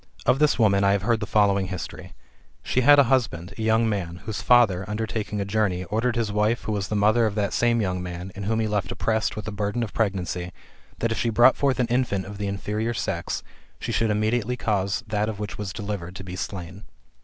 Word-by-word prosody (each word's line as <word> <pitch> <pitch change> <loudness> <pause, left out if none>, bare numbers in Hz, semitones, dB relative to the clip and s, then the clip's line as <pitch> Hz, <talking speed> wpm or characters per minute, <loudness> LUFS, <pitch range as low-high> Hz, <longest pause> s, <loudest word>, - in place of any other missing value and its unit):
Of 135 - +3
this 150 -1 +3
woman 100 -4 +3
I 100 0 +4
have 100 -1 0
heard 115 +1 +2
the 105 - -4
following 100 -3 +3
history: 90 -3 -7 0.5
she 130 - +1
had 145 +3 +7
a 140 - +8
husband, 110 -10 0
[a 105 - -8
youiig 110 +1 +3
man,] 95 -6 -2
whose 110 -2 -4
father, 115 -7 +4
undertaking 105 -1 -3
a 100 - -1
journey, 100 -3 0
ordered 115 +6 -1
his 115 -3 -1
wife, 105 +3 +1
who - - -3
was 100 -2 -1
the 105 - -2
mother 110 +3 +4
of 105 - -4
that 105 -2 0
same 120 -1 +2
young 90 -2 -1
man, 90 +1 -6
and 100 -1 -6
whom 110 +2 0
he 110 - +1
left 105 -3 -1
oppressed 110 -1 0
with 105 - -5
the 110 - -4
burden 105 +3 -2
of 110 - -6
pregnancy, 90 -4 -2 0.4
that 115 - -1
if 115 - -1
she 120 - +1
brought 120 +4 +6
forth 135 -2 +1
an 125 - +3
infant 120 -5 0
of 100 +1 -9
the 100 - -2
inferior 105 +4 -2
sex, 90 - -3 0.4
she - - -4
should 115 0 +1
immediately 110 +3 0
cause 100 0 -1
that 105 0 -1
of 110 - -5
which 105 -1 -4
she - - -8
was 105 -2 -4
delivered 100 -4 -5
to 95 - -7
be 90 -1 -7
slain. 95 +1 -6
105 Hz, 235 wpm, -25 LUFS, 100-115 Hz, 0.5 s, a